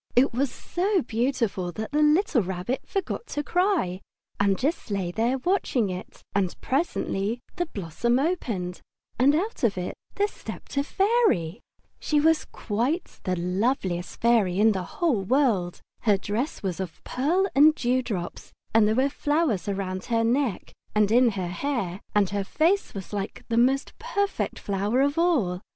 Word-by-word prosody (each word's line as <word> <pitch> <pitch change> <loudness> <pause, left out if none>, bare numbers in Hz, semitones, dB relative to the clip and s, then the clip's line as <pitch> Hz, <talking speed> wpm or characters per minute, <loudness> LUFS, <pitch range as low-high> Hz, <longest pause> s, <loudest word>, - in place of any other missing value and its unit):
It 255 +1 +4
was 270 +3 +1
so 375 -1 0
beautiful 225 -6 -1
that 220 +5 -5
the 300 +1 +2
little 300 - +4
Rabbit 190 +7 -3
forgot 395 +3 -3
to 295 - -3
cry, 350 - +1 0.4
and 200 -1 +3
just 295 +1 -1
lay 195 -4 -1
there 235 +7 +1
watching 260 - 0
it. 180 0 -8
And 195 -3 0
presently 240 - -1 0.2
the 350 -1 0
blossom 205 - -1
opened, 230 - -2 0.4
and 275 +4 +5
out 395 +3 -2
of 210 -5 +2
it 180 0 -3 0.2
there 410 - +2
stepped - - -9
a 280 - +2
fairy. 385 - +2 0.4
She 300 - +1
was 320 +1 +3
quite 245 - -2
the 185 - +1
loveliest 180 -1 -1
fairy 220 -6 +3
in 220 +1 +6
the 190 -3 -1 0.2
whole 290 - +3
world. 205 -6 +1 0.2
Her 210 -3 +3
dress 210 +9 -3
was 185 -2 -2
of 185 -4 -6
pearl 330 +9 +1
and 305 +3 +6
dew 255 -1 +1
drops, 190 -8 -5 0.2
and 220 -1 +5
there 215 - +2
were 260 +3 +3
flowers 290 - 0
round 190 -2 -3
her 230 -1 +1
neck 240 -2 0 0.2
and 210 -1 +3
in 245 +1 +6
her 185 -3 -3
hair, 195 -3 -2
and 205 -2 +4
her 200 -1 -1
face 335 - +1
was 195 +1 -7
like 200 -1 -4
the 230 - 0
most 260 +4 +2
perfect 405 -4 -1
flower 205 +5 0
of 285 +3 +1
all. 240 - +2
235 Hz, 165 wpm, -26 LUFS, 195-295 Hz, 0.4 s, in